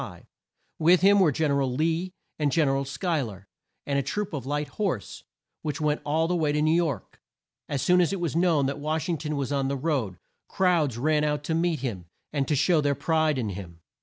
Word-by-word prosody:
With 170 +2 +5
him 200 +1 +6
were 175 -6 +5
Gen 155 +2 0
er 140 0 +2
al 130 -2 0
Lee 165 +5 0 0.3
and 145 -2 +1
Gen 155 +2 +3
er 135 - +1
al 135 0 -1
Schuy 160 +2 -1
ler, 100 -4 -9 0.4
and 140 -1 0
a - - +1
troop 185 +10 -3
of 135 -4 -4
light 145 +1 -1
horse, 185 - -3 0.4
which 150 -3 -3
went 150 -1 0
all 160 +2 +1
the 180 - 0
way 155 -4 +1
to 150 - 0
New 155 +1 +3
York. 165 -4 -1 0.5
As 140 -2 -1
soon 180 0 +4
as 175 - +2
it 195 - -2
was 170 -3 -2
known 165 -5 +3
that 140 +2 -2
Wash 155 +1 -2
ing 165 -3 0
ton 150 -1 -3
was 140 -1 -2
on 135 -1 0
the 140 +1 -1
road, 130 - -1 0.3
crowds 165 -10 +1
ran 150 +4 +2
out 150 -1 0
to 160 - -2
meet 165 -3 0
him, 100 -10 -4 0.3
and 140 -3 0
to 150 - +1
show 155 +3 +3
their 145 -1 +1
pride 155 +1 +1
in 115 -5 -1
him. 90 -4 -8
150 Hz, 230 wpm, -26 LUFS, 135-165 Hz, 0.5 s, him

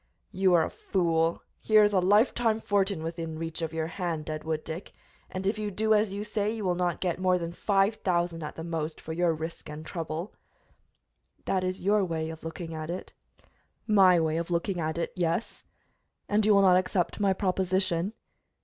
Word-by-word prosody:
"You 185 -1 +3
are 165 -2 +4
a - - -6
fool! 165 -3 0 0.2
Here 215 -1 +5
is 205 0 +3
a 190 - +4
life 205 +6 +4
time 225 -2 +1
fortune 200 -5 0
within 165 -1 -4
reach 165 0 -4
of 160 -1 -2
your 160 -1 -2
hand, 165 -2 -3
Deadwood 155 0 -3
Dick, 165 +4 -6 0.4
and 185 +1 -5
if 210 +2 0
you 210 -1 -2
do 215 +2 +1
as 210 -1 +2
you 200 +1 -4
say 210 -1 -1
you 220 -2 -3
will 180 - +2
not 175 -1 -1
get 180 -1 -1
more 185 -1 +3
than 170 -1 -4
five 195 +3 +2
thousand, 175 -4 0
at 150 - -6
the 160 - -6
most, 165 -2 -3
for 160 - -6
your 175 0 +2
risk 160 0 -6
and 150 +1 -8
trouble." 165 +2 -5 1.1
"That 185 -1 0
is 185 0 -3
your 205 +1 +3
way 160 -3 -2
of 160 - -10
looking 165 0 -6
at 155 0 -5
it." 180 +2 -5 0.7
"My 190 -5 +6
way 160 -1 +1
of 170 +1 -3
looking 175 +2 -1
at 160 0 -2
it, 170 - -2
yes." 175 +3 -2 0.6
"And 210 0 +2
you 210 - +6
will 200 - +5
not 180 -1 +6
accept 185 0 0
my 200 -2 +3
proposition?" 190 -1 0
180 Hz, 200 wpm, -28 LUFS, 165-195 Hz, 1.1 s, My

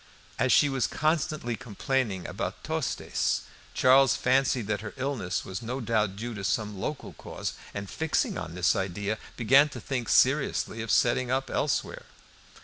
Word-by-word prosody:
As - - +3
she 145 - +6
was 135 -3 0
constantly 155 -5 0
complaining 110 -4 -2
about - - -4
Tostes, - - -1 0.3
Charles 135 0 +5
fancied 130 -2 +2
that 105 0 -2
her 105 -1 -7
illness 130 -9 -2
was 95 0 -5
no 125 +3 -4
doubt 110 -5 0
due 115 +4 -5
to 100 -2 -6
some 105 0 -1
local 150 -2 -4
cause, - - -5 0.2
and 100 0 -5
fixing 160 +9 -1
on 85 - -5
this 90 0 +2
idea, 100 +3 -2 0.2
began 135 +5 +5
to - - -8
think 125 -5 -3
seriously 115 - +2
of 115 - -6
setting 125 +2 +3
up 135 +1 -1
elsewhere. - - -1
120 Hz, 155 wpm, -28 LUFS, 105-135 Hz, 0.3 s, she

